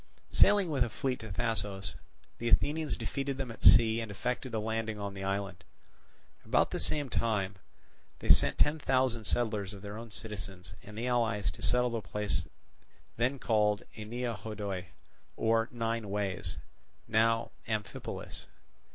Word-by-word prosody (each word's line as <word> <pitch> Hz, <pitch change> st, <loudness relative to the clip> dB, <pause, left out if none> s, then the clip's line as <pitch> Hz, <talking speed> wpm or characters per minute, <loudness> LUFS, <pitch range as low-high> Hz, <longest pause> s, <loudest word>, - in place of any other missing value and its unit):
Sailing 200 Hz, -5 st, +5 dB
with 135 Hz, -4 st, +3 dB
a 120 Hz, -, -2 dB
fleet 125 Hz, +3 st, -2 dB
to 110 Hz, 0 st, -8 dB
Thasos, 100 Hz, -2 st, -2 dB, 0.5 s
the 120 Hz, -, 0 dB
Athenians 150 Hz, +4 st, +2 dB
defeated 140 Hz, -1 st, -2 dB
them 130 Hz, -3 st, -3 dB
at 115 Hz, -, -11 dB
sea 115 Hz, -1 st, +7 dB
and 110 Hz, -, -5 dB
effected 125 Hz, +5 st, -3 dB
a -, -, +1 dB
landing 110 Hz, 0 st, -2 dB
on 100 Hz, -1 st, -4 dB
the 95 Hz, 0 st, -6 dB
island. 95 Hz, -2 st, -2 dB, 0.8 s
About -, -, +2 dB
the -, -, -2 dB
same 145 Hz, -2 st, 0 dB
time 105 Hz, -6 st, 0 dB, 0.6 s
they -, -, -7 dB
sent -, -, +5 dB
ten 150 Hz, +2 st, +3 dB
thousand 130 Hz, -5 st, +1 dB
settlers 105 Hz, -4 st, 0 dB
of 100 Hz, -, -11 dB
their 105 Hz, +1 st, -6 dB
own 115 Hz, 0 st, -8 dB
citizens 95 Hz, -5 st, -7 dB
and 105 Hz, 0 st, -11 dB
the 115 Hz, -, -2 dB
allies 115 Hz, -4 st, +1 dB
to -, -, -13 dB
settle 125 Hz, 0 st, +3 dB
the 115 Hz, -1 st, -2 dB
place 105 Hz, 0 st, -1 dB, 0.7 s
then 125 Hz, +4 st, +1 dB
called 105 Hz, -4 st, +2 dB
Ennea 115 Hz, +1 st, -3 dB
Hodoi 100 Hz, -3 st, -4 dB, 0.5 s
or 115 Hz, +1 st, +2 dB
Nine 115 Hz, -2 st, -2 dB
Ways, 100 Hz, -3 st, -2 dB, 0.5 s
now 115 Hz, +1 st, +2 dB, 0.2 s
Amphipolis. 110 Hz, -2 st, -4 dB
110 Hz, 150 wpm, -31 LUFS, 105-120 Hz, 0.8 s, sea